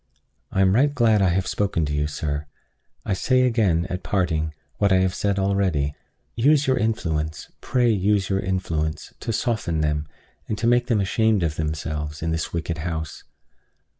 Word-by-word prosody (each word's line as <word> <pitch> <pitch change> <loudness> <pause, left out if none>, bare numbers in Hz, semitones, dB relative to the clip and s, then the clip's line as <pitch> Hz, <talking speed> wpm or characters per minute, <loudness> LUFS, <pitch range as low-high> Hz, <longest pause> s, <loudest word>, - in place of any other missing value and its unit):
I 95 - +1
am 95 0 +4
right 140 +6 +4
glad 115 -7 +3
I 95 - +4
have 95 +2 +1
spoken 95 -6 0
to 75 - -3
you, 75 0 0
sir. 75 0 -3 0.6
I - - 0
say 130 +7 +2
again, 105 -9 +2
at 90 +1 -4
parting, 80 -6 -1 0.2
what 100 -1 +3
I - - +6
have 95 0 +2
said 100 -1 0
already: 95 -7 +1 0.4
Use 145 +4 +4
your 130 - +3
influence, 80 -9 -2
pray 120 -2 +2
use 100 -1 +1
your 95 -1 0
influence, 85 -4 -2
to 115 - -3
soften 110 -9 -1
them, 75 0 0 0.4
and 105 - -2
to 105 - -2
make 120 +1 +3
them 110 -4 +2
ashamed 105 0 +2
of 80 -2 -1
themselves, 75 -1 -3
in 80 - -1
this 80 -1 -2
wicked 85 -1 -3
house. 80 -2 -4
95 Hz, 175 wpm, -23 LUFS, 80-110 Hz, 0.6 s, I